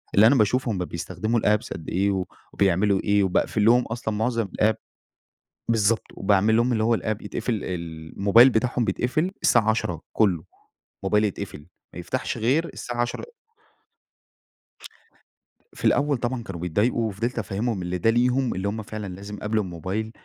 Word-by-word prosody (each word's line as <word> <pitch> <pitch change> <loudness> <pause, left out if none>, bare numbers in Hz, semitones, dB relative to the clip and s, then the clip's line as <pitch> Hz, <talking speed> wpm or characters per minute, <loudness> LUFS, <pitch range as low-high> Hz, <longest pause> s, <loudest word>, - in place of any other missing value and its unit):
اللي 105 +3 +7
أنا 135 - +5
باشوف 125 +3 +2
هم 105 - -1
بيستخدموا 95 +7 -2
الapps 105 +2 +1
قد 80 - -8
إيه 100 +3 +1
و 95 -2 -1 0.3
وبيعملوا 95 +1 +2
إيه 100 0 +2
وباقفل 100 +3 +1
لهم 120 +2 +6
أصلًا 110 -1 -4
معظم 115 0 0
الapp، 110 +1 +5 1.0
بالضبط، 110 -1 +2
وباعمل 100 +2 +2
لهم 120 +2 +2
اللي 110 -1 +1
هو 115 0 +3
الapp 110 -1 -3
يتقفل 110 +3 -3
ال 80 -3 -6
الموبايل 115 +6 +7
بتاعهم 120 0 0
بيتقفل 155 +11 0
الساعة 110 -2 +4
22:00 90 -7 -1
كله، 95 -7 +2 0.6
الموبايل 105 +2 +2
يتقفل 95 -7 -5 0.3
ما - - -8
يفتحش 125 +8 -3
غير 130 +9 +1
الساعة 120 0 -4
10:00 120 - -3 2.5
في - - -7
الأول 145 -1 +3
طبعًا 120 0 -3
كانوا 90 -6 -7
بيتضايقوا، 105 +7 +1
وفضلت 115 +5 -3
أفهمهم 110 0 -2
إن 90 0 -3
ده 115 - +3
ليهم 125 +2 +2
اللي 95 +2 -2
هم 110 +2 -3
فعلًا 105 0 -6
لازم 100 +2 -8
قبل 110 +1 0
الموبايل 95 +4 -4
110 Hz, 155 wpm, -24 LUFS, 95-120 Hz, 2.5 s, اللي